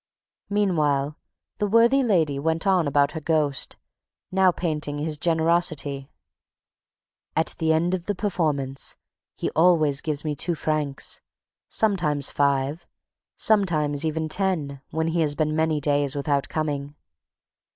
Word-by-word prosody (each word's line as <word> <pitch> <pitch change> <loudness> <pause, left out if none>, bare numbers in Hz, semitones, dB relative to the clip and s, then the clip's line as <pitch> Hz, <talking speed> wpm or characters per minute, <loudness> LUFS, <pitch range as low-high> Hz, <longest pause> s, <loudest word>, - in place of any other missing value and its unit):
Meanwhile, 155 -8 +1 0.4
the 210 - +1
worthy 235 +6 +4
lady 165 - +1
went 160 +4 0
on 185 -5 +3
about 140 +1 +2
her 160 - -6
ghost, 150 -3 0 0.5
now 190 0 +4
painting 150 -4 -2
his 155 +1 -2
generosity: 160 -4 0 1.3
"At 160 - +2
the 160 -1 +2
end 165 +3 +2
of 180 -1 -3
the 205 - 0
performance, 150 -9 -1 0.4
he - - -3
always 155 -4 +3
gives 150 -1 -3
me 150 -1 -1
two 170 +4 0
francs, 150 -3 -2 0.5
sometimes 170 -10 +1
five, 140 +3 0 0.5
sometimes 155 -9 +1
even 160 0 -1
ten, 155 -6 -1
when 160 0 -1
he 165 +1 0
has 150 -2 +1
been 155 0 0
many 160 -1 +1
days 145 -1 0
without 140 -1 0
coming. 145 -2 -3
155 Hz, 130 wpm, -24 LUFS, 145-175 Hz, 1.3 s, worthy